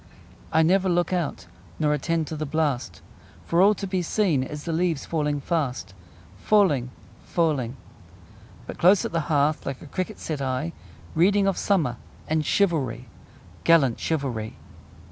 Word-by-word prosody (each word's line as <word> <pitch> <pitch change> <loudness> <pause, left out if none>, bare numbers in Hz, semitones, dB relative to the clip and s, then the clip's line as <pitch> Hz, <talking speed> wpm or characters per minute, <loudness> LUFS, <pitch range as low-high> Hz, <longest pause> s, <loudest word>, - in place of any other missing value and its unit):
I 160 +1 +4
never 190 +3 +3
look 175 +1 +1
out 175 -5 -2 0.3
Nor 150 -1 +2
attend 165 +2 0
to 155 - -6
the 155 0 -4
blast; 140 -5 -1 0.4
For 170 +1 +2
all 205 +2 +6
to 200 - -5
be 185 -1 -1
seen 175 -5 +1
Is 145 +3 -6
the 165 - -3
leaves 165 -3 0
falling 150 -3 -1
fast: 135 - -2 0.5
Falling, 150 - +3 0.3
falling! 140 -7 0 0.9
But - - -8
close 185 +3 +5
at - - -3
the 165 - 0
hearth, 150 0 +2
Like 135 -2 -4
a - - -12
cricket, 185 +5 -4
sit 150 -3 -4
I, 135 +5 -2 0.4
Reading 195 +5 +3
of 195 -1 +2
summer 155 - +1 0.3
And 155 0 +1
chivalry 140 - 0 0.5
Gallant 145 -8 +4
chivalry! 130 -9 -2
160 Hz, 150 wpm, -25 LUFS, 140-175 Hz, 0.9 s, all